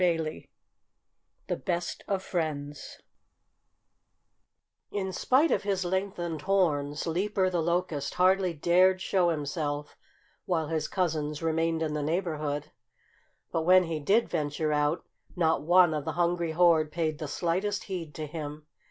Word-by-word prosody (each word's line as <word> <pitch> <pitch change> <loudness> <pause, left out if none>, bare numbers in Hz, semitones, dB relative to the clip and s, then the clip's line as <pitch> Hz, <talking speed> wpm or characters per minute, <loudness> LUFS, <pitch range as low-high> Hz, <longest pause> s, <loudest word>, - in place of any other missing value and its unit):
XXIII 165 -3 -1 1.0
THE - - -2
BEST 175 -2 -3
OF 195 -2 -1
FRIENDS 150 -5 -4 1.9
In 190 -2 -3
spite 270 - +3
of - - +2
his 195 -2 -1
lengthened 175 -4 -2
horns, 150 -7 +1
Leaper 185 +3 0
the 175 -2 0
Locust 165 -4 -1
hardly 185 0 +3
dared 180 +4 +3
show 185 -2 +2
himself 150 -1 -3 0.5
while 160 -4 0
his 160 -1 -1
cousins 155 -5 -1
remained 165 0 +1
in 155 -1 -2
the 150 - -1
neighborhood. 155 -3 -2 0.8
But 165 - 0
when 185 +3 +6
he 165 -2 -3
did 205 +10 +2
venture 150 +1 -1
out, 150 +2 0 0.3
not 165 -3 +2
one 175 +1 +5
of 150 -2 -2
the 160 - -2
hungry 170 -1 0
horde 160 -2 +4
paid 155 -2 -1
the 155 - -4
slightest 185 +7 -1
heed 175 -6 -6
to 155 - -4
him. 150 -1 -7
165 Hz, 135 wpm, -28 LUFS, 150-185 Hz, 1.9 s, when